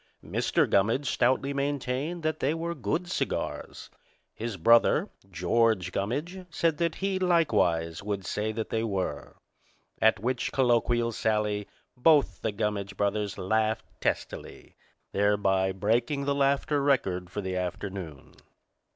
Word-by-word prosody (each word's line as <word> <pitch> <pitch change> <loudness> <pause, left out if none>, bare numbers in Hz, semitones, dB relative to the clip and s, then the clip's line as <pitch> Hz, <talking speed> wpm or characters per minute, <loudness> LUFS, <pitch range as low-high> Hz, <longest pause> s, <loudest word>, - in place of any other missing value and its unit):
Mr. - - +1
Gummidge 115 +8 +2
stoutly 130 +2 +1
maintained 140 +3 -2
that 155 0 -1
they 145 +4 +1
were 170 +1 -3
good 155 - -2
cigars. 180 - -3 0.4
His 115 -2 -5
brother, 115 +7 +4 0.2
George 95 +2 +1
Gummidge, 150 - -3
said 165 -2 0
that 170 -1 0
he, 195 -1 0
likewise, 90 - +2
would 100 -2 -3
say 105 +2 -1
that 110 0 -4
they 110 0 0
were. 95 -9 -3 0.7
At 110 -2 +4
which 125 +3 -1
colloquial 120 -2 +2
sally 105 -2 0 0.3
both 135 - +3
the 110 - -1
Gummidge 100 -2 -3
brothers 100 0 -1
laughed 110 +3 0 0.2
testily, - - -4 0.4
thereby 100 -2 +2
breaking 115 +9 0
the 140 - +1
laughter 140 +1 +1
record 95 -11 +1
for 105 - -4
the 95 -1 -3
afternoon. 90 -4 -5
115 Hz, 125 wpm, -28 LUFS, 100-140 Hz, 0.7 s, brother